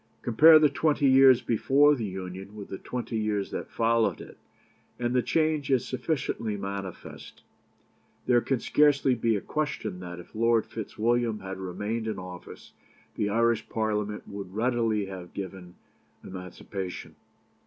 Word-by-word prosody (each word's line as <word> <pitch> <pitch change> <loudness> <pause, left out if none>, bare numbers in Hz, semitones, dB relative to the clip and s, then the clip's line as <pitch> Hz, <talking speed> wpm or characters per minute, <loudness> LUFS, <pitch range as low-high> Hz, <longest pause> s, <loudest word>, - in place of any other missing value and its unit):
Compare 155 +7 +7
the 155 -1 +5
twenty 145 0 +1
years 130 -1 +6
before 140 +5 +4
the 120 -6 -2
Union 95 +1 -7
with 100 -2 -9
the 95 - -6
twenty 120 -2 -4
years 105 -2 -1
that - - -5
followed 115 -5 +1
it, - - -12 0.6
and 120 0 -1
the 125 - +3
change 155 +3 0
is 130 -3 +2
sufficiently 125 -6 -2
manifest. 100 -2 -7 0.8
There 120 -1 +4
can 135 0 -1
scarcely 140 0 +3
be 115 -2 +1
a 100 - -2
question 150 -11 -3
that 90 -1 -8
if 90 - -13
Lord 115 0 +2
Fitzwilliam 115 0 -1
had 95 0 -6
remained 105 +5 -3
in 110 -2 -3
office 90 -1 -10 0.4
the 105 - -1
Irish 115 +1 +1
Parliament 105 -1 -2
would 100 -2 -8
readily 115 -3 +1
have 95 -2 -9
given 95 -2 -7 0.5
emancipation. 90 0 -7
110 Hz, 145 wpm, -27 LUFS, 95-125 Hz, 0.8 s, Compare